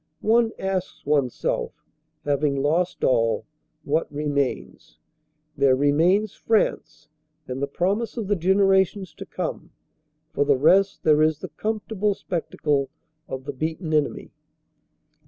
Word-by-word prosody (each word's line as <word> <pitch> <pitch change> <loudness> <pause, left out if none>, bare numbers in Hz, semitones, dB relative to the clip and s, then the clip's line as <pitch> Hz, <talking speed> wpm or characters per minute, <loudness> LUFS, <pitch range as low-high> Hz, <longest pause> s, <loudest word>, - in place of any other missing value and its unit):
One 225 +1 +4
asks 190 -1 -3
oneself, 140 -4 0 0.5
having 145 0 +1
lost 160 +6 0
all, 115 -3 +2 0.4
what 155 +3 -1
remains? 145 -2 -3 0.6
There 140 -2 +4
remains 165 +10 +2
France 155 -9 -1 0.4
and 130 +1 -5
the 140 - 0
promise 200 - -1
of 220 -4 -3
the 205 - +2
generations 190 +1 +2
to - - -10
come. - - -5 0.6
For 145 - +2
the 140 -1 +3
rest, 190 +8 +3
there 155 -1 +4
is 155 -1 +3
the - - -8
comfortable 210 -1 -2
spectacle 150 -6 -2 0.4
of 130 0 -5
the 145 - -4
beaten 160 +4 -3
enemy. 150 -2 0
155 Hz, 120 wpm, -24 LUFS, 145-195 Hz, 0.6 s, One